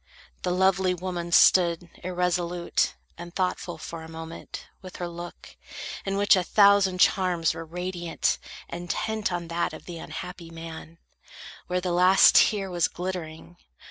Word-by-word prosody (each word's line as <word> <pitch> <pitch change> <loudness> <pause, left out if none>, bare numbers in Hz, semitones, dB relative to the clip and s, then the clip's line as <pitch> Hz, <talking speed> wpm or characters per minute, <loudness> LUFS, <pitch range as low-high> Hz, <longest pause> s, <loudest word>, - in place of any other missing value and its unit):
The - - -1
lovely 185 0 +2
woman 175 -1 -4
stood 170 -1 +5 0.2
irresolute, 175 -1 0 0.2
And 175 0 -9
thoughtful, 180 -2 -2
for 165 +1 -7
a 160 - -10
moment, 165 0 -8 0.2
with 185 -2 -11
her 175 - -4
look, 175 0 -9 0.5
In 195 0 0
which 205 0 +5
a 185 - +2
thousand 200 -1 +4
charms 180 -4 +3
were 165 - -6
radiant, 175 0 -2 0.3
Intent 195 +5 -3
on 175 -1 -3
that 170 +1 -1
of - - -10
the 170 -2 -7
unhappy 170 +1 -8
man, 165 0 -9 0.7
Where 180 0 -1
the 180 -1 -2
last 185 +2 +6
tear 195 -3 +3
was 175 -2 +2
glittering. 175 -2 -6
175 Hz, 140 wpm, -26 LUFS, 170-185 Hz, 0.7 s, last